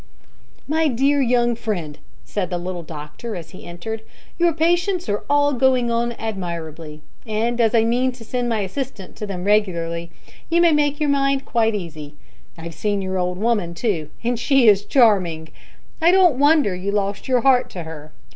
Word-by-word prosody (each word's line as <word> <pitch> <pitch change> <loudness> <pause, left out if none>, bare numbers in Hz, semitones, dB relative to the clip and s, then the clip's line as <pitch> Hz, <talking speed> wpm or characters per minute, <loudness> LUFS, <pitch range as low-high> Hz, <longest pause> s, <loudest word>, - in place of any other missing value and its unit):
"My 315 +1 +2
dear 275 +2 +2
young 240 -1 +2
friend," 190 -10 -4 0.2
said 195 -4 -3
the 180 - -2
little 175 0 -5
doctor, 155 +8 -8
as 165 -2 -8
he 185 - -12
entered, 195 +6 -6 0.4
"your 345 0 +4
patients 350 +3 +1
are 205 0 -1
all 290 0 +3
going 255 -2 +2
on 235 +1 0
admirably, 165 -8 -6 0.2
and 230 +2 -1
as 225 0 +3
I 225 - +5
mean 245 +3 +1
to 245 -2 -12
send 245 +1 -2
my 225 -2 0
assistant 200 -1 -5
to 210 - -5
them 180 -3 -5
regularly, 170 -5 0 0.4
you 335 +1 +3
may 340 -1 +5
make 295 -1 +1
your 300 -1 +1
mind 275 -1 +1
quite 225 -2 +1
easy. 155 -6 -7 0.4
I've 165 0 -8
seen 205 +2 -1
your 190 0 -2
old 180 0 -1
woman 205 -5 0
too, 170 -8 -2
and 240 0 -1
she 270 -2 +3
is 205 -1 +5
charming. 185 - +2 0.5
I 330 - +5
don't 355 -7 +4
wonder 290 - +4
you 190 +3 -3
lost 200 -1 -2
your 255 -2 +2
heart 255 0 +3
to 175 - -7
her. 155 -1 -10
220 Hz, 180 wpm, -21 LUFS, 180-265 Hz, 0.5 s, I